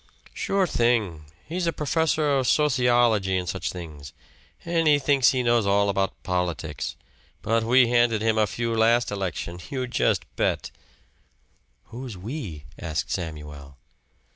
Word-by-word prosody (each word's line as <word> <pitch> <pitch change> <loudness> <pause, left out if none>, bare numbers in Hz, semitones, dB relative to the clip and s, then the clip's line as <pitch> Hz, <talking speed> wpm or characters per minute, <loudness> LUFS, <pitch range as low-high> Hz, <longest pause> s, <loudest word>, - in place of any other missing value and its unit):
"Sure 195 -1 0
thing! 115 - 0 0.2
He's 175 +2 -2
a - - +2
professor 155 0 0
of 130 -2 +1
sociology 120 -9 +3
an' 90 - -2
such - - -3
things, 75 -6 -9 0.5
an' 165 -1 +1
he 150 -1 +6
thinks 140 -2 +3
he 130 -1 0
knows 120 -3 +2
all 100 +1 +3
about 95 -1 -1
politics. 90 -4 -3 0.5
But 115 0 +1
we 120 +1 +4
handed 120 -3 +2
him 110 -1 +2
a 105 - +3
few 115 +3 -2
last 115 +1 +3
election 90 -3 -4
just 130 +4 -1
you - - -37
bet!" - - 0 1.1
"Who's 120 -3 -8
'we'?" 95 - -6
asked 80 -1 -3
Samuel. 75 -5 -6
115 Hz, 140 wpm, -25 LUFS, 90-130 Hz, 1.1 s, he